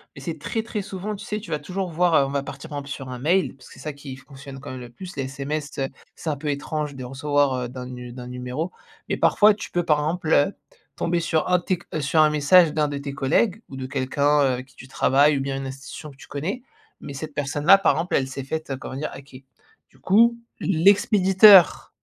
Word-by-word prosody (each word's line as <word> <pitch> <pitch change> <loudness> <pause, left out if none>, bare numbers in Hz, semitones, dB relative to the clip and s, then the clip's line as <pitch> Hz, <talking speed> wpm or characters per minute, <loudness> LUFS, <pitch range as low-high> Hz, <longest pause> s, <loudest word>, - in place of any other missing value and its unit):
Mais - - -10
c'est - - -5
très, 225 -2 -3
très 220 -2 -4
souvent 200 +1 -5
tu - - -10
sais, 210 0 -3
tu 185 -6 -11
vas 150 - -1
toujours 185 +4 -4
voir, 170 0 +2
heu 140 - +5
on 135 - -4
va 140 0 -1
partir, 140 +3 -9
par 145 -1 -4
exemple, 140 0 -10
sur 135 -2 -6
un 125 -1 -6
mail, 170 +2 +1
parce 130 - -17
que - - -14
c'est - - -15
ça 155 -2 -5
qui 140 -2 -9
fonctionne 135 0 -12
quand 140 - -8
même 130 - -7
le 120 -1 -9
plus. 180 +9 -10
Les 135 - -1
SMS, 145 +3 -5
heu, 135 -1 0 0.3
c'est 160 - -5
un 145 - -2
peu 150 - -6
étrange 145 0 -3
de 130 - -7
recevoir 145 +1 0
heu, 120 - -5
d'un 125 0 -7
nu 125 -1 -8
d'un 125 -1 -8
numéro 125 +7 -4 0.4
mais - - 0
parfois 210 0 +5
tu 205 - -8
peux, 175 0 0
par 150 -3 +2
exemple 160 +2 -2
heu, 145 +8 +3 0.4
tomber 170 0 0
sur 165 -2 0
un 180 - +5
de - - -14
tes, 185 -2 -1
heu 155 - -1
sur 155 +3 +3
un 155 - +5
message 150 +2 +5
d'un 150 -1 +1
de 145 - -4
tes 140 0 -6
collègues 170 - +1
ou 135 - -9
de 130 -1 -5
quelqu'un, 140 +2 +1
heu, - - +4
avec 130 +1 -6
qui - - -24
tu 130 - -12
travailles 140 +2 +3
ou - - -1
bien 135 0 -3
une 135 0 -5
institution 135 +3 -9
que 135 - -18
tu - - -14
connais. 190 - -4 0.4
Mais 140 - -8
cette 150 +1 -7
personne-là, 145 +6 +4
par 195 - +3
exemple, 165 +3 -1
elle 130 -1 +1
s'est 135 0 -6
faite, 155 +2 -5
heu, 135 - -2
comment 130 - -8
dire? 150 +3 -3
Hacker. 135 -1 -12 0.5
Du - - -25
coup, 235 +4 +4 0.2
l'expéditeur 195 +1 +5
145 Hz, 255 wpm, -23 LUFS, 135-175 Hz, 0.5 s, heu